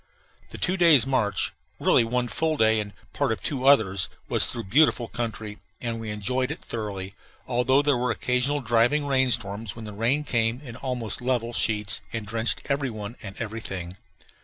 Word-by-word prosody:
The - - -9
two 185 +1 0
days' 165 -8 +6
march 110 -7 0 0.3
really - - +4
one 120 +2 0
full 160 +5 0
day 110 -2 +4
and 105 -1 -4 0.2
part 140 -4 0
of 110 - -3
two 135 -2 -1
others 100 -9 +4 0.2
was - - +5
through 115 - -4
beautiful 125 +2 +3
country, 110 -3 -5 0.2
and 115 -1 -3
we 110 -1 -6
enjoyed 125 +5 -1
it 155 - -5
thoroughly, 100 -4 -5 0.3
although 130 +3 +3
there 145 -2 +3
were 125 +1 0
occasional 125 +4 0
driving 120 +5 +2
rain 130 -2 +2
storms, 105 -2 -2
when 115 -1 -8
the 105 - -7
rain 120 +8 +1
came 115 -3 0
in 125 -6 -9
almost 125 -4 -3
level 120 -2 -1
sheets 105 -3 +1
and 115 -2 -4
drenched 110 +2 -1
every 140 -1 0
one 110 0 -7
and 95 -1 -9
everything. 95 -6 -5
115 Hz, 180 wpm, -25 LUFS, 110-130 Hz, 0.3 s, days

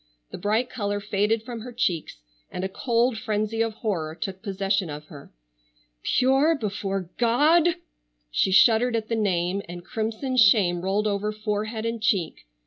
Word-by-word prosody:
The - - -7
bright 215 +6 +1
color 205 -4 -3
faded 210 +2 0
from 235 -1 -6
her 250 +2 -8
cheeks, 185 - -1 0.3
and 180 - -5
a - - 0
cold 235 +2 0
frenzy 215 +1 -1
of 225 -1 -1
horror 160 -7 -1
took 190 -1 -5
possession 195 -3 -1
of 150 0 -7
her. 140 -2 -12 0.7
"Pure 270 - +3
before 195 -5 -3
God!" 305 +9 +4 0.6
She 190 - +1
shuddered 230 +5 +5
at 220 -1 -2
the 230 - 0
name, 190 -3 0
and 175 0 -8
crimson 225 +4 -3
shame 195 -6 +5
rolled 195 +3 0
over 210 0 0
forehead 215 +1 -3
and 230 -1 -3
cheek. 195 - -1
215 Hz, 155 wpm, -25 LUFS, 195-230 Hz, 0.7 s, shuddered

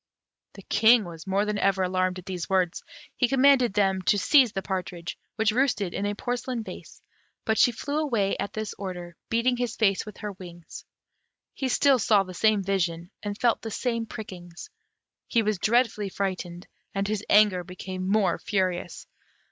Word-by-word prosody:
The - - -12
King 225 0 +5
was 165 0 -10
more 195 +2 +1
than 210 -1 -2
ever 195 -1 +2
alarmed 185 0 0
at 185 - -10
these 180 -2 -5
words; 185 -3 +1 0.3
he 245 - +2
commanded 265 -4 +4
them 195 -2 +2
to 205 - +4
seize 255 +3 +5
the 195 - -4
partridge, 180 -3 -4 0.2
which 220 0 +2
roosted 215 -7 0
in 205 - -2
a 205 - -2
porcelain 245 +1 -3
vase; - - -11 0.4
but 220 -1 +1
she 245 - +6
flew 285 +6 -3
away 230 -10 0
at 200 - -3
this 215 -1 -4
order, 180 -3 -6
beating 240 +2 +1
his 245 -2 -2
face 200 -4 +2
with 210 -2 -11
her 210 - -5
wings. 175 -3 -11 0.7
He 265 - -2
still 270 +1 +4
saw 210 -2 +4
the 185 -1 -9
same 215 +2 +2
vision, 175 -2 -1
and 205 -1 -4
felt 235 -1 +2
the 225 - -5
same 230 0 -2
prickings; 185 - -9 0.6
he 230 - +2
was 210 -3 0
dreadfully 220 -1 +1
frightened, 185 -2 -4 0.3
and 195 0 0
his 215 0 -2
anger 205 -4 +5
became 185 +1 -6
more 205 -2 +2
furious. 185 -3 -2
205 Hz, 175 wpm, -26 LUFS, 185-230 Hz, 0.7 s, she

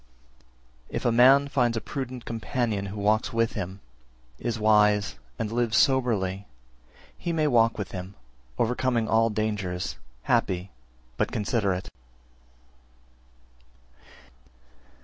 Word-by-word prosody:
328. - - -8
If - - -5
a 120 -1 +2
man 135 +4 +6
find 120 -4 +1
a - - +1
prudent 130 -1 -6
companion 115 -3 -2
who 100 +2 -6
walks 105 +2 +1
with 115 0 +1
him, 95 -1 -5 0.6
is 120 -1 -2
wise, 105 - +3 0.2
and 105 - -3
lives 115 -1 +1
soberly, 105 -8 +1 0.7
he 170 - -4
may 160 -2 +1
walk 115 -5 +3
with 100 -4 -5
him, 95 +1 -7 0.4
overcoming 120 -1 +1
all 115 +1 +3
dangers, 100 -7 -2 0.3
happy, 90 +1 0 0.5
but - - 0
considerate. 100 -3 -1
110 Hz, 110 wpm, -26 LUFS, 100-120 Hz, 0.7 s, man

